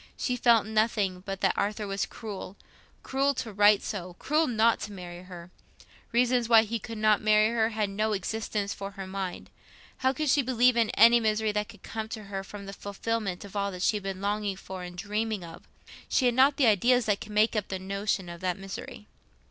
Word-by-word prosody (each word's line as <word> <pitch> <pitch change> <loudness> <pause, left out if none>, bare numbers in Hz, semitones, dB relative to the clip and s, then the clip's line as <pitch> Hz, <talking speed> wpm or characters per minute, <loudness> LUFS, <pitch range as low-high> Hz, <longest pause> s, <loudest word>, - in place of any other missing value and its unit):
She 250 - -1
felt 235 -3 +4
nothing 215 -4 0
but 195 0 -4
that 190 - +3
Arthur 210 +1 -1
was 195 0 -2
cruel—cruel 235 +6 -5
to 225 -4 -5
write 205 0 +5
so, 180 -4 -5
cruel 310 +2 +1
not 230 -1 +3
to 210 - -6
marry 175 -2 -8
her. 180 -1 -11 0.6
Reasons 245 0 +2
why 225 -2 +7
he 225 +1 -3
could 225 +2 -8
not 215 -1 +3
marry 215 0 +4
her 225 -1 +1
had 215 -2 -1
no 215 +2 -1
existence 205 0 -2
for 195 0 -6
her 195 -1 -7
mind; 190 -1 -5 0.5
how 260 0 +2
could 305 +3 -3
she 290 - +4
believe 250 -1 +3
in 230 -2 +2
any 235 +3 +7
misery 215 -1 +1
that 210 0 -2
could 210 - -15
come 220 -1 -5
to 220 -1 -6
her 195 -1 -5
from 200 +1 -9
the 195 - -7
fulfilment 205 -1 -3
of 200 - -12
all 200 -2 -2
she 200 +4 +1
had 205 - -8
been 195 -1 -5
longing 205 0 -1
for 190 0 -8
and 180 0 -8
dreaming 210 +1 -2
of? 165 - -11 0.4
She 260 - +2
had 245 - +4
not 270 +3 +4
the 275 - +4
ideas 240 +3 +4
that 205 -2 0
could 215 - -8
make 215 +2 +3
up 210 -3 -1
the 190 - -3
notion 195 0 -2
of 170 0 -9
that 180 -1 -1
misery. 195 +1 -8
210 Hz, 210 wpm, -28 LUFS, 195-230 Hz, 0.6 s, why